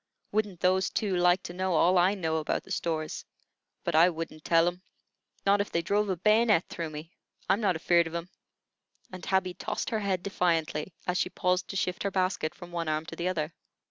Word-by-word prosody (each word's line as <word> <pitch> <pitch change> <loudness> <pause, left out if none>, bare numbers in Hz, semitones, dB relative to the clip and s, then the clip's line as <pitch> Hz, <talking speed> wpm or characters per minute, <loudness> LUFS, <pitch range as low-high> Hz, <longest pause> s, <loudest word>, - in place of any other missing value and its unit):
Wouldn't 205 -4 -1
those 185 +1 +3
two 200 -4 -1
like 180 +1 +3
to 175 - -7
know 185 -1 0
all 180 +3 +4
I 185 +3 +4
know 160 -4 -1
about 155 - -1
the - - -13
stores? 160 -3 -2 0.6
But - - -1
I 165 +3 +6
wouldn't 165 -2 -6
tell 165 0 +4
'em, 175 +1 -3 0.6
not 200 +1 +4
if 205 - -4
they 170 - 0
drove 205 +3 +1
a 190 - +1
bayonet 215 -1 +4
through 165 -2 -4
me. 155 +2 -8 0.4
I'm 205 - +2
not 190 -4 +2
afeard 170 +1 +3
of 165 - -7
'em;" 170 +1 -5 0.8
and 185 -1 -9
Tabby 190 -1 +1
tossed - - -4
her 220 - 0
head 190 -3 -1
defiantly, 165 -4 0
as 180 0 0
she - - 0
paused 180 0 0
to - - -7
shift 180 -1 -1
her 200 - 0
basket 185 -4 -1
from 175 0 -11
one 170 -1 -3
arm 155 +1 -1
to 165 - -8
the 170 +2 -2
other. 160 -3 -2
180 Hz, 210 wpm, -29 LUFS, 165-190 Hz, 0.8 s, I